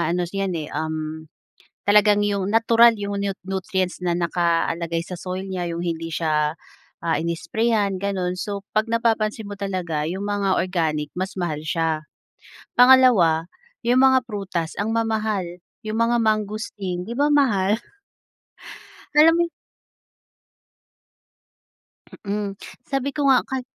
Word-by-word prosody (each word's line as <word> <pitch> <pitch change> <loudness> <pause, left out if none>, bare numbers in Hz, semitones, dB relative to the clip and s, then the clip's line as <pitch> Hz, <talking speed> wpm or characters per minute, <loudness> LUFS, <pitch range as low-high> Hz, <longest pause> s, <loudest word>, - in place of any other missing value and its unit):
ano 170 +2 0
'yan 195 -2 -2
eh, 155 -2 -5
um, 155 0 -4 0.6
talagang 205 0 +5
'yong 200 -2 -1
natural 230 +1 +5
'yong 200 0 -3
nut 200 -1 -3
nutrients 190 -1 -2
na 175 -1 +1
nakalagay 170 -1 0
sa 185 - -6
soil 185 +2 -5
niya, 180 -2 -3
'yong 170 0 -4
hindi 165 -1 -3
siya 155 -2 0 0.5
ah, 165 -1 +1
in-i-sprayhan 200 +5 0
gano'n 185 -3 -1
so 200 +1 -4
'pag 215 +1 +1
napapansin 225 -2 0
mo 205 - -5
talaga 180 -6 -2
'yong 190 +5 -4
mga 200 -2 0
organic 160 -5 -1
mas 185 +1 -3
mahal 155 -4 -2
siya. 160 -1 -1 0.8
Pangalawa, 240 -11 +6 0.4
'yong 245 +2 +4
mga 265 -1 +6
prutas 190 -6 -3
ang 210 +2 -1
mamahal, 220 -3 0 0.4
'yong 215 +1 -3
mga 230 +1 +3
mangosteen 210 -4 -2
'di 230 - -7
ba 290 +1 +3
mahal? 215 -9 +3 1.4
Kala 310 +2 +7
mo 340 - +2
eh - - -8 2.8
Mm, 200 -1 -2 0.3
sabi 275 0 -1
ko 300 - -1
nga 265 -2 +6
kal 265 -1 -2
195 Hz, 130 wpm, -23 LUFS, 170-220 Hz, 2.8 s, Kala